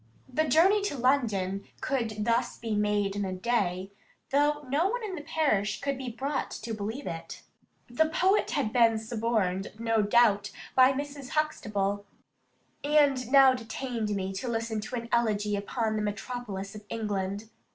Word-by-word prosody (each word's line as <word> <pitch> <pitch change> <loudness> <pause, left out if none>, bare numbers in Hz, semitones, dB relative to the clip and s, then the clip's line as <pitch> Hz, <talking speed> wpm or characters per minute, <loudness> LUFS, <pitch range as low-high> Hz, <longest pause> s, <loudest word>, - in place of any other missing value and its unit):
The 265 +5 0
journey 375 +7 +4
to 290 - -2
London 215 -7 +1 0.2
could 220 -6 -2
thus 235 +1 +1
be 225 -2 -3
made 205 -1 +1
in 205 - -1
a 190 -1 -2
day, 190 -3 -1 0.4
though 295 +1 +2
no 295 +8 +2
one 485 +3 -2
in 410 -3 -4
the 340 - -5
parish 290 -10 0
could 280 0 -1
be 260 -1 -5
brought 270 +5 -2
to 225 0 -6
believe 220 +6 -4
it. 165 0 -6 0.4
The 310 +7 +1
poet 375 +5 +2
had 270 -8 -1
been 230 -2 +5
suborned, 220 -4 -1
no 225 -1 +1
doubt, 205 -1 +4 0.2
by 260 0 +6
Mrs. 280 -1 -5
Huxtable, 205 -10 0 0.8
and 285 -4 +3
now 270 -2 +8
detained 230 -3 -3
me 190 0 -3
to 195 +7 -4
listen 225 -1 -2
to 220 +4 -5
an 235 -1 -4
elegy 210 -3 +1
upon 215 +2 -1
the - - -1
metropolis 205 -1 -4
of 210 -1 -9
England. 205 -1 -3
230 Hz, 160 wpm, -28 LUFS, 205-270 Hz, 0.8 s, now